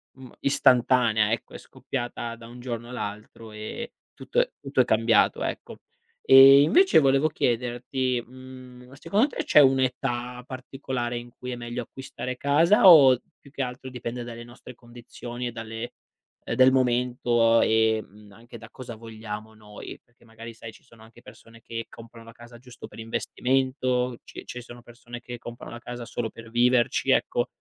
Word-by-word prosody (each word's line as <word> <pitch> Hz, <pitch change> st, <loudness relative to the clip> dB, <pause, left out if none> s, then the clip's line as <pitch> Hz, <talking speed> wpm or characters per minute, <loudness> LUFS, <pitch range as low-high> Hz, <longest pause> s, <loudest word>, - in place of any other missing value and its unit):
ehm, 130 Hz, -2 st, -13 dB
istantanea, 120 Hz, -5 st, +3 dB
ecco. 115 Hz, -, -4 dB
È -, -, -7 dB
scoppiata 120 Hz, -2 st, -6 dB
da 115 Hz, 0 st, -13 dB
un 120 Hz, +1 st, -12 dB
giorno 120 Hz, -1 st, -6 dB
all'altro 110 Hz, -1 st, -7 dB
e 110 Hz, -, -7 dB, 0.2 s
tutto -, -, -2 dB
è -, -, +2 dB
tutto -, -, -4 dB
è -, -, +1 dB
cambiato, -, -, +2 dB
ecco. -, -, -5 dB, 0.5 s
E 135 Hz, +1 st, +9 dB
invece 365 Hz, -, +5 dB
volevo 135 Hz, +1 st, +3 dB
chiederti, 125 Hz, -2 st, -2 dB
mhmm, 130 Hz, 0 st, -13 dB
secondo 205 Hz, -, +1 dB
te -, -, -5 dB
c'è -, -, +5 dB
un'età 130 Hz, -2 st, +1 dB
particolare 130 Hz, -2 st, -5 dB
in 120 Hz, 0 st, -8 dB
cui 125 Hz, -, -7 dB
è 125 Hz, -, -4 dB
meglio 120 Hz, +1 st, -5 dB
acquistare 130 Hz, 0 st, -7 dB
casa 165 Hz, +9 st, +4 dB
o 135 Hz, -7 st, +8 dB, 0.2 s
più 140 Hz, -, -18 dB
che 140 Hz, -, -5 dB
altro 125 Hz, +1 st, -5 dB
dipende 120 Hz, -1 st, -6 dB
dalle 120 Hz, 0 st, -9 dB
nostre 120 Hz, +1 st, -13 dB
condizioni 120 Hz, +1 st, -9 dB
e -, -, -4 dB
dalle 115 Hz, +1 st, -7 dB, 0.5 s
del 130 Hz, 0 st, +4 dB
momento 120 Hz, -2 st, +2 dB
e, 110 Hz, 0 st, +2 dB
mhmm, 105 Hz, +1 st, -18 dB
anche 115 Hz, +3 st, -13 dB
da 115 Hz, -, -13 dB
cosa 125 Hz, -3 st, -9 dB
vogliamo 110 Hz, -1 st, -9 dB
noi. 105 Hz, -1 st, -11 dB
Perché 120 Hz, 0 st, -28 dB
magari 115 Hz, +1 st, -11 dB
sai 110 Hz, 0 st, -11 dB
ci -, -, -19 dB
sono 115 Hz, -1 st, -20 dB
anche 110 Hz, 0 st, -17 dB
persone 115 Hz, 0 st, -16 dB
che 115 Hz, 0 st, -6 dB
comprano 115 Hz, 0 st, -14 dB
la 115 Hz, -, -13 dB
casa 120 Hz, 0 st, -14 dB
giusto 125 Hz, +1 st, -12 dB
per -, -, -14 dB
investimento. 125 Hz, +1 st, -1 dB
Ci -, -, -11 dB
ci 125 Hz, -, -8 dB
sono 120 Hz, 0 st, -13 dB
persone 120 Hz, 0 st, -11 dB
che 120 Hz, 0 st, -8 dB
comprano 120 Hz, 0 st, -10 dB
la 120 Hz, -, -8 dB
casa 120 Hz, 0 st, -8 dB
solo 115 Hz, -1 st, -4 dB
per 115 Hz, 0 st, -13 dB
viverci, 120 Hz, +1 st, +2 dB
ecco. -, -, +1 dB
120 Hz, 165 wpm, -25 LUFS, 115-130 Hz, 0.5 s, E